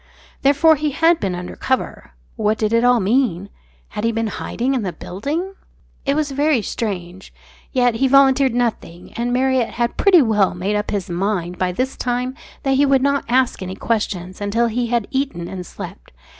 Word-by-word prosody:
Therefore 290 +3 +4
he 300 +1 0
had 325 +3 +3
been 190 -3 -2
under 180 0 -7
cover. 260 -1 -3 0.2
What 215 -1 0
did 215 0 0
it 230 +1 +3
all 245 -1 +5
mean? 200 -3 +1 0.4
Had 210 - -5
he 230 - +2
been 225 0 -1
hiding 240 +4 -2
in 260 - 0
the 190 -3 -2
building?... 285 - -4 0.5
It 275 - +2
was 300 -2 -1
very 285 -3 +1
strange. 190 -4 -5 0.4
Yet 245 -2 +2
he 270 +3 +2
volunteered 270 -1 +4
nothing; 220 -8 -3
and 240 +1 -2
Marriott 255 -1 +1
had 235 0 -1
pretty 370 -6 +6
well 210 -6 +2
made 190 +4 -1
up 210 0 -2
his 200 -3 -2
mind 180 -1 -2
by 185 -1 +1
this 255 +8 -2
time 250 +1 -2 0.3
that 270 -2 +2
he 285 - +4
would 270 -1 +3
not 280 0 +1
ask 255 -2 +2
any 185 0 -5
questions 195 -5 -2
until 210 +4 +1
he 240 +2 -1
had 235 -3 0
eaten 265 -11 -2
and 180 -2 -7
slept. - - -9
235 Hz, 185 wpm, -20 LUFS, 200-270 Hz, 0.5 s, pretty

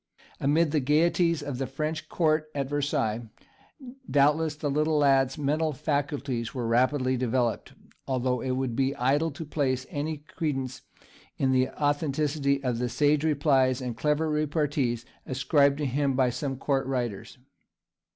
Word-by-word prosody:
Amid 150 +3 +2
the 155 - +2
gaieties 165 +3 +2
of 140 -3 -5
the 135 - -2
French 155 +3 -4
Court 155 -2 +1
at 140 -2 -1
Versailles 120 -6 -1 0.8
doubtless 150 +2 +3
the 150 -1 -2
little 150 +2 +1
lad's 135 -2 +3
mental 150 +2 0
faculties 140 -4 -2
were 125 -2 -2
rapidly 130 +3 +2
developed, 120 -1 -1 0.3
although 125 -2 0
it 130 -1 -1
would 130 -3 -2
be 135 +2 +1
idle 145 +6 +1
to 160 +2 -7
place 135 -3 -1
any 150 +2 -3
credence 140 -3 -4 0.6
in 135 -1 +1
the 130 0 +2
authenticity 145 -1 0
of 125 -3 -1
the 125 0 -1
sage 145 +3 +2
replies 140 -4 +2
and 125 -3 -4
clever 150 +5 0
repartees 145 -5 0 0.2
ascribed 140 +1 +2
to 150 - -2
him 135 +1 0
by 130 -1 +2
some 135 +1 -3
Court 135 0 0
writers. 120 -4 -3
140 Hz, 145 wpm, -27 LUFS, 130-150 Hz, 0.8 s, doubtless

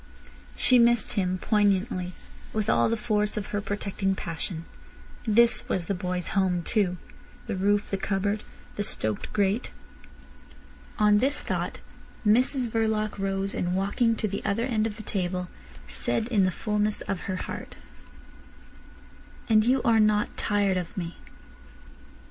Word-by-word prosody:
She 250 -1 +4
missed 235 -1 +4
him 185 -3 0
poignantly, 195 -2 +1 0.4
with 215 -1 +1
all - - +3
the 230 - 0
force 210 -2 0
of 210 - -3
her 205 - 0
protecting 200 -1 -2
passion. 165 -1 -5 0.6
This 230 +2 +4
was 175 - 0
the 200 - -1
boy's 180 -1 -3
home 185 -3 +1
too—the 185 -2 -3
roof, 205 +2 +1
the 195 - +1
cupboard, 200 +2 -1 0.4
the - - 0
stoked 110 - -2
grate. 205 +2 +1 1.3
On 210 -1 +5
this 275 +5 +2
thought - - -3 0.4
Mrs 250 +4 +3
Verloc 220 -2 0
rose, 195 0 -1
and 180 0 -1
walking 205 +4 +1
to 220 - -1
the 200 0 -4
other 215 +3 0
end 225 -4 +1
of 215 -1 -7
the 215 - -8
table, 180 -2 -2 0.4
said 225 - -1
in 205 -6 +3
the - - +3
fulness 210 +2 -1
of 195 0 -4
her 190 - 0
heart: - - -6 1.7
"And 215 -1 +5
you 255 +2 +2
are 230 -1 +4
not 210 -1 +2
tired 200 -2 +1
of 180 0 -5
me." 170 -2 -4
205 Hz, 145 wpm, -27 LUFS, 190-220 Hz, 1.7 s, On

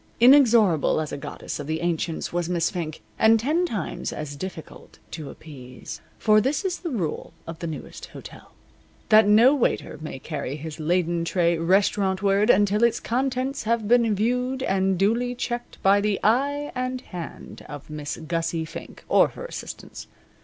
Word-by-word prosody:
Inexorable 235 - +5
as 155 -2 -3
a - - -4
goddess 140 - -6
of 145 - -6
the 160 +1 -2
ancients 170 -1 -2
was 175 -1 -1
Miss 170 -2 +1
Fink, 160 -4 -5 0.2
and 225 0 +5
ten 315 +9 +1
times 205 - -4
as 150 -1 -6
difficult 170 0 -9
to 150 -4 -6
appease. 130 -5 -10 0.2
For 215 0 +4
this 280 - -1
is 365 -2 -1
the 345 - -4
rule 190 - -3
of 165 -1 -8
the 170 - -4
Newest 155 -4 -7
Hotel, - - -12 0.6
that 215 -1 +7
no 225 +6 +6
waiter 245 - -1
may 155 -3 -6
carry 140 -1 -5
his 155 +1 -7
laden 170 +1 0
tray 170 0 +1
restaurantward 195 +3 +2
until 205 +1 +4
its 235 -1 +3
contents 260 +2 -1
have 225 -1 0
been 230 -2 +4
viewed 250 +5 0
and 190 -3 +1
duly 235 +6 +1
checked 240 0 -4
by 200 +1 +5
the 205 -1 0
eye 285 +6 +1
and 255 0 -3
hand 175 -8 -9
of 145 +1 -9
Miss 150 -1 -5
Gussie 165 0 -2
Fink, 165 +1 -10
or - - +5
her - - -9
assistants. - - -8
195 Hz, 165 wpm, -24 LUFS, 165-240 Hz, 0.6 s, that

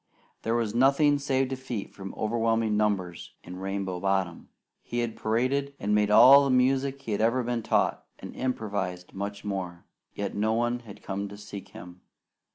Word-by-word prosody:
There 115 +1 0
was 115 -3 -1
nothing 140 +4 +4
save 135 -1 0
defeat 130 -5 -5
from 95 -1 -8
overwhelming 115 0 +1
numbers 100 -5 -1
in 90 - -9
Rainbow 95 -1 -3
Bottom. 95 -3 -1 0.3
He 120 - -6
had 120 -2 -1
paraded, 130 +6 0
and 105 +1 0
made 105 0 +3
all 135 +6 +8
the 140 - 0
music 135 +2 +2
he 110 - -3
ever 115 +4 +2
had 125 - -1
been 120 -1 -1
taught, - - +1
and - - -10
improvised 100 -8 -3
much 100 +1 -5
more. 90 -3 -4 0.3
Yet 100 0 -3
no 110 +2 +1
one 120 +1 0
had 110 -4 -13
come 100 +1 -4
to 100 - -10
seek 100 -1 -9
him. 90 +1 -12
110 Hz, 170 wpm, -27 LUFS, 100-125 Hz, 0.3 s, all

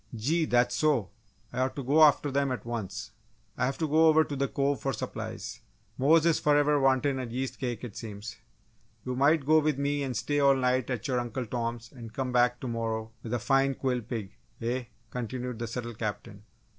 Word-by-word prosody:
"Gee! 155 +9 +1
That's 120 -2 +2
so! 145 -11 +1 0.4
I - - -3
ought 130 0 0
to 140 - -4
go 145 +5 +3
after 145 -1 +5
them 140 0 +1
at 125 - -4
once!" 110 -2 -5 0.4
"I 125 - +1
have 135 - -3
to 160 - -1
go 160 +2 +5
over 160 0 +6
to 145 - -5
the 140 0 0
Cove 140 +1 0
for 135 - -1
supplies - - -5 0.4
Mose 155 +4 +4
is 165 -2 +3
forever 145 0 +3
wantin' 135 0 +2
a 130 - -3
yeast 130 +3 -4
cake, 120 -3 -3
it 115 -5 -7
seems! 110 0 -7 0.7
You 125 0 -2
might 140 +2 +3
go 155 +2 +6
with 155 -2 +1
me 145 +1 0
and 130 -3 -2
stay 145 0 0
all 140 -1 +5
night 130 -1 +1
at 125 0 -2
your 125 -2 +1
Uncle 120 +1 -3
Tom's 115 0 -4
and 115 -4 -10
come 130 +1 -2
back 125 0 +3
to 130 - -4
morrow 115 -1 -3
with 115 - -7
a 120 - +1
fine 135 +3 +2
quill 125 -2 -1
pig, 110 -4 -5 0.3
eh?" 120 +2 -2 0.3
continued 125 0 -4
the 115 - -3
subtle 120 0 -5
Captain. 105 -2 -5
125 Hz, 205 wpm, -29 LUFS, 115-140 Hz, 0.7 s, over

